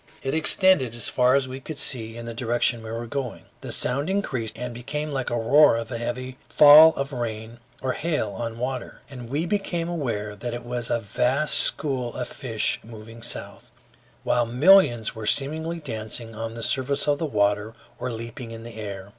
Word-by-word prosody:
It 135 Hz, -, -2 dB
extended 160 Hz, -, +4 dB
as 120 Hz, -, -2 dB
far 125 Hz, +1 st, +3 dB
as 135 Hz, -2 st, +1 dB
we 130 Hz, +1 st, -7 dB
could 150 Hz, +2 st, -8 dB
see, 115 Hz, -4 st, -1 dB
in 115 Hz, -, -7 dB
the 115 Hz, -, -6 dB
direction 120 Hz, 0 st, 0 dB
we 110 Hz, -, -8 dB
were 115 Hz, +1 st, -4 dB
going. 125 Hz, +1 st, -5 dB, 0.2 s
The -, -, -6 dB
sound 140 Hz, +6 st, 0 dB
increased 130 Hz, -, -2 dB
and 125 Hz, 0 st, -5 dB
became 150 Hz, +6 st, -4 dB
like 135 Hz, -2 st, -2 dB
the -, -, -1 dB
roar 120 Hz, +2 st, +5 dB
of 115 Hz, +2 st, -5 dB
a 115 Hz, -, -3 dB
heavy 130 Hz, +2 st, -5 dB
fall 155 Hz, +2 st, +9 dB
of 140 Hz, +1 st, -4 dB
rain 115 Hz, -1 st, -5 dB, 0.2 s
or 130 Hz, -1 st, 0 dB
hail 150 Hz, -10 st, -1 dB
on 115 Hz, +3 st, -5 dB
water, 125 Hz, +1 st, -5 dB
and 125 Hz, -3 st, -9 dB
we 150 Hz, +6 st, -1 dB
became 175 Hz, -3 st, -1 dB
aware 115 Hz, -11 st, -3 dB
that 120 Hz, +3 st, -5 dB
it 120 Hz, 0 st, -8 dB
was 120 Hz, -1 st, -4 dB
a 120 Hz, -, +1 dB
vast 125 Hz, +7 st, +1 dB
school 130 Hz, -5 st, -1 dB
of 125 Hz, -, -3 dB
fish 115 Hz, -5 st, -2 dB
moving 115 Hz, +1 st, -11 dB
south, -, -, -5 dB, 0.5 s
while 120 Hz, -1 st, +1 dB
millions 125 Hz, -, +5 dB
were 110 Hz, -1 st, -6 dB
seemingly 160 Hz, +6 st, 0 dB
dancing 115 Hz, -4 st, -6 dB
on 115 Hz, +1 st, -5 dB
the 115 Hz, -, -6 dB
surface 135 Hz, +6 st, 0 dB
of 145 Hz, -1 st, +2 dB
the 165 Hz, -, -1 dB
water 105 Hz, -2 st, 0 dB, 0.2 s
or 125 Hz, 0 st, -3 dB
leaping 115 Hz, +2 st, -7 dB
in 115 Hz, 0 st, -9 dB
the 115 Hz, -1 st, -10 dB
air. 100 Hz, -2 st, -7 dB
120 Hz, 195 wpm, -24 LUFS, 115-140 Hz, 0.5 s, fall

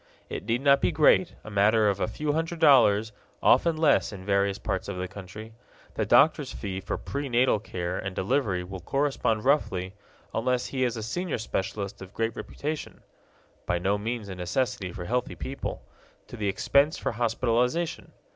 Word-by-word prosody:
It -, -, -5 dB
need 115 Hz, +3 st, 0 dB
not 140 Hz, 0 st, +5 dB
be -, -, +2 dB
great 160 Hz, +4 st, +4 dB
a 110 Hz, -, -9 dB
matter 105 Hz, +2 st, +4 dB
of 100 Hz, -1 st, +1 dB
a -, -, 0 dB
few 150 Hz, -1 st, -2 dB
hundred 165 Hz, +2 st, -2 dB
dollars, 115 Hz, -9 st, +5 dB, 0.3 s
often 165 Hz, -2 st, +4 dB
less 155 Hz, -6 st, +3 dB
in 95 Hz, -3 st, -9 dB
various 100 Hz, 0 st, +1 dB
parts -, -, -3 dB
of 100 Hz, -2 st, -4 dB
the 90 Hz, 0 st, -3 dB
country. 100 Hz, +4 st, -10 dB, 0.4 s
The -, -, -2 dB
doctor's 150 Hz, -2 st, +4 dB
fee 95 Hz, -3 st, -5 dB
for 95 Hz, -, -3 dB
pre 140 Hz, 0 st, -4 dB
natal 120 Hz, -2 st, +3 dB
care 90 Hz, -3 st, -4 dB
and 95 Hz, -1 st, -5 dB
delivery 100 Hz, -4 st, 0 dB
will 95 Hz, +1 st, -7 dB
correspond 135 Hz, -, 0 dB
roughly, 95 Hz, -10 st, +1 dB, 0.4 s
unless 125 Hz, +2 st, 0 dB
he 130 Hz, -1 st, -2 dB
is 120 Hz, -1 st, -2 dB
a 110 Hz, -, -4 dB
senior 175 Hz, +8 st, -2 dB
specialist 100 Hz, -2 st, -4 dB
of 95 Hz, 0 st, -11 dB
great 115 Hz, 0 st, -1 dB
reputation 150 Hz, +1 st, -5 dB, 0.7 s
(by 90 Hz, -, +1 dB
no 95 Hz, +4 st, 0 dB
means 115 Hz, 0 st, -3 dB
a 95 Hz, -, -6 dB
necessity 90 Hz, +1 st, -2 dB
for 90 Hz, 0 st, -7 dB
healthy 125 Hz, +5 st, -1 dB
people), 135 Hz, +1 st, -5 dB, 0.5 s
to -, -, -8 dB
the 105 Hz, -3 st, -2 dB
expense 140 Hz, -, +2 dB
for -, -, -2 dB
hospitalization. 120 Hz, +7 st, 0 dB
115 Hz, 175 wpm, -27 LUFS, 100-135 Hz, 0.7 s, not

